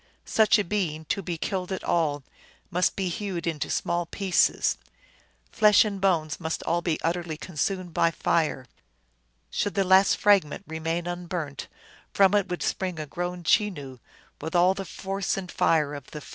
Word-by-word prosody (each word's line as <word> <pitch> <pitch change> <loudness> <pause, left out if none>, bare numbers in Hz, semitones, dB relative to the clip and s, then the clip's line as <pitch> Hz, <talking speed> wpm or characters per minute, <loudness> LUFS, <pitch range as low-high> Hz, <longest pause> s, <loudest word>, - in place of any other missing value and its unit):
Such 220 +1 +4
a 210 - +1
being, 170 -5 -2
to 195 - -4
be 175 -2 -4
killed 185 +1 -3
at 190 - -3
all, 150 -4 0 0.5
must 180 +1 +1
be 190 -2 -1
hewed 180 -1 -3
into 160 -3 -2
small 175 0 -1
pieces; 190 0 +1 0.7
flesh 210 0 +5
and 200 -2 -4
bones 165 -6 +1
must 160 -1 -3
all 170 +1 0
be 165 -2 -1
utterly 170 -1 -2
consumed 180 +2 -3
by 165 - +3
fire. 160 -5 0 0.9
Should 205 - -1
the 195 - +3
least 190 +1 +5
fragment 200 -8 +3
remain 165 +2 -3
unburnt, 175 -5 -4 0.5
from 195 -1 +5
it 205 -2 +2
would 180 - -3
spring 185 -3 -2
a 155 - -3
grown 175 +3 -4
Chenoo, 150 - 0 0.4
with 160 +3 -5
all 180 +2 +5
the 195 0 -6
force 195 +1 -3
and 185 -2 -5
fire 150 -3 +2
of 140 -3 -8
the 150 - -8
first. - - -13
175 Hz, 170 wpm, -26 LUFS, 160-195 Hz, 0.9 s, flesh